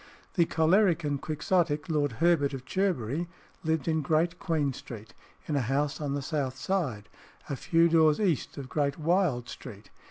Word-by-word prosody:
The 170 - +3
choleric 165 +2 +3
and 145 -2 -1
Quixotic 155 0 0
Lord 145 -5 0
Herbert 145 -1 +2
of 130 -1 -9
Cherbury 175 - -1 0.4
lived 160 -2 0
in 160 -1 +1
Great 160 +4 +1
Queen 155 -6 0
Street, 115 -3 -10 0.3
in 150 - -2
a 140 - +2
house 140 +5 -1
on 140 -1 -1
the 140 - -3
south 135 -3 -2
side, 135 - -2 0.4
a - - 0
few 165 +5 +3
doors 160 -2 +4
east 180 - 0
of 140 -2 -6
Great 140 0 -1
Wyld 160 -6 +1
Street. 100 0 -10
155 Hz, 165 wpm, -28 LUFS, 140-170 Hz, 0.4 s, doors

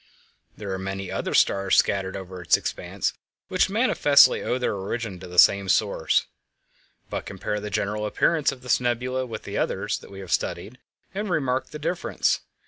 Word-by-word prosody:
There 100 -2 -5
are 95 - -3
many 95 0 -5
other - - -2
stars 95 -1 +3
scattered 95 -1 +1
over 95 -1 -8
its 90 - +4
expanse - - -3 0.4
which 185 0 +2
manifestly 195 - +5
owe 125 - -1
their 125 - -1
origin 100 0 -4
to 90 - -9
the 90 0 -9
same 100 +1 +6
source. - - +2 0.9
But - - -4
compare 105 - -3
the 105 0 -5
general 105 +2 -1
appearance 155 +7 +2
of 125 -2 -11
this 125 - +2
nebula 125 +1 -1
with 110 -2 -7
the - - -4
others - - -1
that - - -14
we 95 - -10
have 95 - -9
studied, 125 +4 -2 0.3
and 205 +1 -3
remark 130 -6 0
the 150 - -8
difference. 170 +3 0
110 Hz, 175 wpm, -25 LUFS, 95-130 Hz, 0.9 s, same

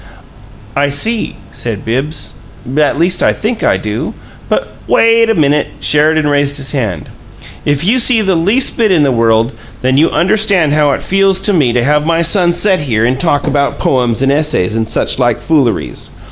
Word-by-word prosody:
"I 140 +1 +1
see," 220 +11 -1 0.2
said 115 -4 -5
Bibbs. 135 +6 -3 0.4
"At 150 -1 +1
least 175 +3 +1
I - - +3
think 220 +1 -3
I - - +2
do. 105 0 -5 0.3
But - - -1
" - - -22
"Wait 230 0 +3
a 225 - +2
minute!" 150 -1 +1
Sheridan 155 +1 +2
raised 145 0 0
his 135 -1 -4
hand. 115 - -3 0.6
"If 145 0 0
you 240 +6 +2
see 235 -2 +3
the 195 -1 +1
least 200 +10 +1
bit 220 -3 +2
in 165 -5 +3
the 140 - +2
world, 115 0 +1 0.3
then 130 +1 +1
you 160 +3 +3
understand 190 -5 +1
how 150 -1 +2
it - - -4
feels 195 0 +1
to 205 - +1
me 145 -9 +2
to 120 0 +1
have 150 +3 +1
my 165 +1 +1
son 175 0 +2
set 190 +1 +1
here 115 -6 -1
and 130 +2 0
talk 145 -3 0
about 140 -1 -1
'poems 125 -1 0
and 135 - +2
essays' 145 -9 0
and 110 -1 -2
such - - 0
like 120 -2 +1
fooleries. 135 -10 -1
150 Hz, 190 wpm, -12 LUFS, 130-180 Hz, 0.6 s, I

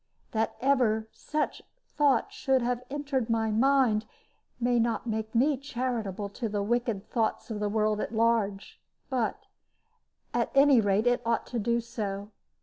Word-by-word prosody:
That 220 0 -1
ever 245 -5 +2
such 305 0 -3 0.3
thought 295 +7 +2
should 265 - +1
have 245 0 -1
entered 275 -4 -2
my 225 -1 +1
mind 235 -2 +3 0.5
may 245 0 +2
not 230 0 0
make 220 0 -3
me 275 +4 +3
charitable 240 -7 -3
to 225 +3 -4
the 205 -1 -1
wicked 230 -2 -1
thoughts 225 0 -1
of 210 - -3
the 210 0 0
world 215 0 +1
at - - -3
large, 220 -3 0 0.3
but, 245 -4 -1 0.9
at - - +1
any 275 -3 +6
rate, 205 +1 +2
it 245 0 +3
ought 230 0 0
to 240 - -3
do 235 +2 +1
so. 210 -3 -5
230 Hz, 150 wpm, -28 LUFS, 215-255 Hz, 0.9 s, any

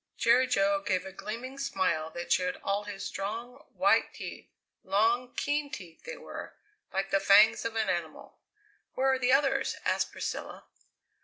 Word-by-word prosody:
Jerry 245 +3 +4
Jo 195 -4 +2
gave 185 -2 -1
a 190 - -7
gleaming 240 +8 -6
smile 185 -11 0
that 175 +2 -7
showed 180 0 +1
all 200 +1 -1
his 200 -1 -6
strong, 235 +7 -5
white - - +3
teeth - - -8 0.3
long, 235 +5 +2
keen 290 0 -1
teeth 180 - -10
they - - -6
were, - - -8 0.4
like 195 +1 -2
the 195 - +4
fangs 210 +4 +6
of 230 0 -3
an 220 -2 +1
animal. 170 -4 -4 0.6
"Where 265 +1 +3
are 260 - 0
the 250 0 +2
others?" 270 0 +2
asked - - +1
Priscilla. - - -5
215 Hz, 160 wpm, -29 LUFS, 195-255 Hz, 0.6 s, fangs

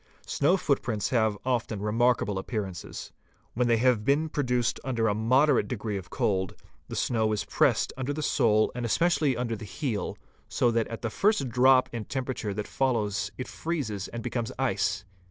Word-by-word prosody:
Snow 170 +7 +2
footprints 120 - 0
have 110 -4 +2
often 120 -4 -1
remarkable 105 -1 +1
appearances. 95 -4 -5 0.4
When 125 +1 +1
they 115 -1 +4
have 120 -2 +3
been 145 +6 +2
produced 125 -5 0
during 115 -5 +1
a - - +1
moderate 125 +3 +3
degree 110 -2 -3
of 95 -3 -6
cold, 95 -3 0 0.3
the - - -6
snow 110 -3 +1
is 100 -2 -2
pressed - - +2
under 130 +1 -3
the 150 +1 -3
sole 110 -5 +3
and 125 - -4
especially 150 +3 +2
under 120 -2 -1
the 110 - -9
heel, 110 +1 -3 0.3
so 120 - +2
that 115 -1 +1
at 115 - -7
the 115 - -2
first 195 - +2
drop 130 +2 +5
in 115 -3 -4
temperature 130 -5 -3
that 105 +1 -4
follows 105 -6 0
it 125 - -5
freezes 125 - -3
and 120 -1 -6
becomes 120 -1 -2
ice. 100 -5 0
115 Hz, 170 wpm, -28 LUFS, 105-130 Hz, 0.4 s, drop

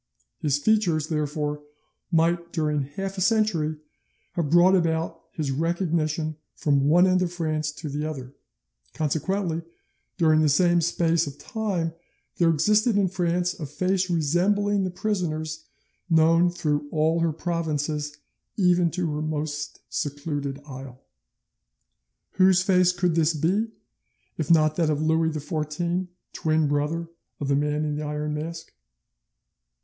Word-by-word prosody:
His 145 -2 +1
features, 170 -3 +1
therefore, 150 -1 -2 0.5
might 170 +1 +1
during 150 -3 0
half 190 +8 -5
a - - -2
century 185 -7 +1 0.5
have 165 -4 -2
brought 175 +4 +6
about 165 -3 0
his 150 -4 -3
recognition 160 0 -1 0.2
from 140 -2 +2
one 175 +4 +6
end 185 0 +3
of 180 -2 0
France 155 -3 -2
to 155 - -7
the 145 +1 -3
other; 130 -3 -7 0.6
consequently, 165 +3 -1 0.6
during 155 -3 +4
the 155 - +3
same 175 +4 +4
space 165 -1 +1
of 140 0 -7
time 190 -7 -2 0.4
there 170 -2 +4
existed 210 +7 +3
in 195 -2 +2
France 175 -1 0
a 150 - -4
face 185 +5 0
resembling 190 +5 +1
the - - -1
prisoner's 160 -5 -3 0.4
known 165 +1 +5
through 150 -4 -2
all 160 +2 +1
her 165 -1 +2
provinces, 150 -3 -2 0.4
even 180 -3 +3
to 175 +1 -2
her 150 - -2
most 150 -1 -4
secluded 145 -1 -3
isle. 130 -2 -9 1.3
Whose 185 -1 +4
face 180 -2 +4
could 180 -1 0
this 160 0 +2
be, 185 +9 +1 0.7
if 160 0 -3
not 155 -2 +4
that 165 -3 +2
of 150 -1 0
Louis 160 +1 +2
XVI, 160 +4 -2 0.3
twin 155 -1 +1
brother 150 +4 -1 0.3
of 140 - -3
the 140 - +3
Man 150 +1 0
in 150 -1 -2
the - - -3
Iron 150 0 -3
Mask? 160 +2 -6
160 Hz, 135 wpm, -25 LUFS, 150-175 Hz, 1.3 s, brought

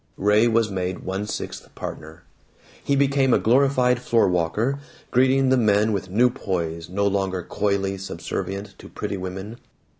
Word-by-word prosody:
Ray 105 +3 +4
was 115 -2 +2
made 95 -1 -2
a - - -12
one 95 +3 -3
sixth - - -6
partner. 80 +2 -8 0.6
He 140 - +1
became 135 -2 +3
a - - +5
glorified 125 0 +3
floor 115 -4 +3
walker, 95 +10 0 0.3
greeting 130 +1 +3
the 130 - +4
men 105 -1 +3
with 95 -2 -3
new 120 +6 +3
poise, 85 -8 -3
no 100 +2 0
longer 95 -2 0
coyly 100 +1 -1
subservient 100 +1 -5
to - - -12
pretty 100 -1 -4
women. 95 +4 -6
100 Hz, 155 wpm, -23 LUFS, 95-125 Hz, 0.6 s, a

